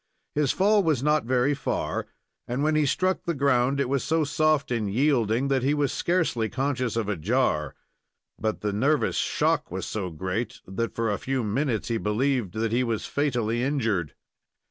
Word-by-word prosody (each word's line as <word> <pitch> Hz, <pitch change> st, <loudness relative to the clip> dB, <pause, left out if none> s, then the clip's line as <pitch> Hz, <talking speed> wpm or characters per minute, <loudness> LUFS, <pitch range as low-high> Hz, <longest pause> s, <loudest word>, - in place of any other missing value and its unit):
His 145 Hz, -2 st, +2 dB
fall 205 Hz, +2 st, +3 dB
was 155 Hz, -8 st, +1 dB
not 150 Hz, -3 st, +2 dB
very 125 Hz, +3 st, +2 dB
far, 140 Hz, -, -2 dB, 0.4 s
and 125 Hz, +4 st, -1 dB
when 155 Hz, +1 st, +2 dB
he 155 Hz, -1 st, +2 dB
struck 185 Hz, +6 st, +1 dB
the 170 Hz, -2 st, -1 dB
ground, 135 Hz, -1 st, +2 dB
it 140 Hz, -, +1 dB
was 135 Hz, 0 st, 0 dB
so 160 Hz, 0 st, +1 dB
soft 150 Hz, -1 st, +1 dB
and 110 Hz, -4 st, -1 dB
yielding 125 Hz, -1 st, +2 dB
that 135 Hz, -1 st, +2 dB
he 140 Hz, +4 st, +2 dB
was 145 Hz, -3 st, +1 dB
scarcely 165 Hz, -11 st, 0 dB
conscious 130 Hz, -1 st, -1 dB
of 115 Hz, -3 st, -1 dB
a 105 Hz, -, 0 dB
jar; 85 Hz, -, 0 dB, 0.6 s
but 110 Hz, -1 st, -2 dB
the 105 Hz, -1 st, -1 dB
nervous 140 Hz, +8 st, +1 dB
shock -, -, +1 dB
was -, -, -4 dB
so 100 Hz, -4 st, -3 dB
great 95 Hz, +8 st, -3 dB
that, 105 Hz, +5 st, -3 dB
for 115 Hz, -2 st, 0 dB
a 100 Hz, -, -2 dB
few 130 Hz, -2 st, -1 dB
minutes, 115 Hz, +2 st, -1 dB
he 115 Hz, -1 st, 0 dB
believed 115 Hz, -2 st, 0 dB
that 110 Hz, 0 st, -1 dB
he 120 Hz, +2 st, +2 dB
was 115 Hz, -3 st, -2 dB
fatally 120 Hz, -5 st, 0 dB
injured. 115 Hz, -, -1 dB
125 Hz, 185 wpm, -26 LUFS, 110-145 Hz, 0.6 s, fall